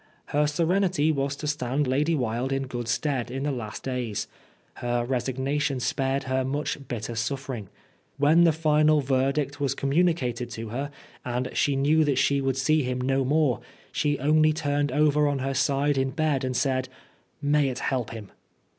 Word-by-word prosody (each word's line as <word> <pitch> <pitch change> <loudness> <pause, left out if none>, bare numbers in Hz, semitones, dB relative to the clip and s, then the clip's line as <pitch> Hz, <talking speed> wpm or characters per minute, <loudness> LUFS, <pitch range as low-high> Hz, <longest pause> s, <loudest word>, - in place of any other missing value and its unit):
Her 150 +1 +3
serenity 170 0 +2
was 140 -1 -1
to 150 - -6
stand 145 -1 0
Lady 145 +5 +1
Wilde 125 0 -1
in 135 0 -1
good 120 -2 -5
stead 130 -1 -1
in 135 +2 -4
the 145 - 0
last 115 -6 -6
days; 125 -5 -3 0.5
her 120 0 -1
resignation 135 +2 -1
spared 135 +2 0
her 130 0 0
much 140 +1 -3
bitter 120 -1 -4
suffering. 120 -2 -3 0.5
When 150 +4 +5
the 170 - +6
final 155 -1 +3
verdict 135 +2 0
was 135 -2 0
com 135 0 -2
municated 130 -8 +1
to 115 -1 -6
her, 135 +6 -3 0.3
and 125 +1 -2
she 145 - +1
knew 150 +4 +3
that 145 -4 +1
she 140 +1 +2
would 135 -1 0
see 155 +4 +3
him 125 -1 -2
no 135 +1 +1
more, 140 -3 +2 0.3
she 145 -1 0
only 155 +3 +3
turned 145 -1 0
over 150 0 +3
on 145 -1 0
her 135 +1 -2
side 140 +1 +1
in 135 0 +1
bed 145 -1 0
and 130 -1 -1
said, 130 -1 0 0.5
"May 145 -1 +2
it 125 - -4
help 125 -4 -1
him!" 110 -3 -9
135 Hz, 175 wpm, -26 LUFS, 130-150 Hz, 0.5 s, the